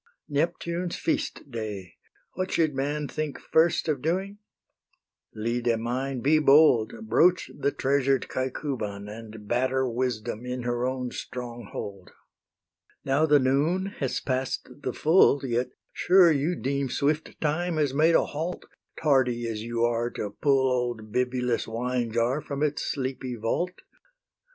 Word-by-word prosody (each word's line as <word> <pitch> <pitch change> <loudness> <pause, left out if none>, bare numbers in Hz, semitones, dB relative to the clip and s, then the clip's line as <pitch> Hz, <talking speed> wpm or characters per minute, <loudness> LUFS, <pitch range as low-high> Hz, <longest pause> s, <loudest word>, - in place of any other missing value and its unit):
Neptune's 170 +3 -1
feast 145 - -2
day! 105 -6 -5 0.4
what 185 +1 -2
should 155 -3 +2
man 145 +2 -2
Think 155 -1 -4
first 160 +1 +2
of 145 -5 0
doing? 190 +6 -1 1.0
Lyde 115 +1 0
mine, 125 +3 -2
be 155 +4 +4
bold, 150 - +4
Broach 180 -3 +3
the 140 - 0
treasured 135 -1 +1
Caecuban, 125 -6 -3
And 110 0 -9
batter 130 +2 +1
Wisdom 120 -2 -2
in 125 0 -4
her 120 +1 0
own 130 -1 -3
stronghold. 120 -6 -7 1.0
Now 140 +4 +3
the 150 -1 +6
noon 155 +9 +1
has 135 -3 -1
pass'd 130 +1 -3
the 130 - -2
full, 150 -2 +4
Yet 120 0 0 0.2
sure 180 -2 +5
you 155 +4 +1
deem 140 -2 -1
swift 150 +4 -1
Time 165 +2 0
has 145 -4 +1
made 160 +4 +4
a - - +4
halt, 160 +5 -4 0.3
Tardy 125 -5 +2
as 110 -2 -3
you 115 +1 0
are 120 0 0
to 105 -4 -5
pull 135 +2 +2
Old 120 -4 -2
Bibulus' 125 -1 0
wine 120 +1 -2
jar 120 +6 +1
from 140 0 -3
its 150 -1 0
sleepy 130 -2 -3
vault. 145 +11 -2
130 Hz, 135 wpm, -27 LUFS, 120-150 Hz, 1.0 s, the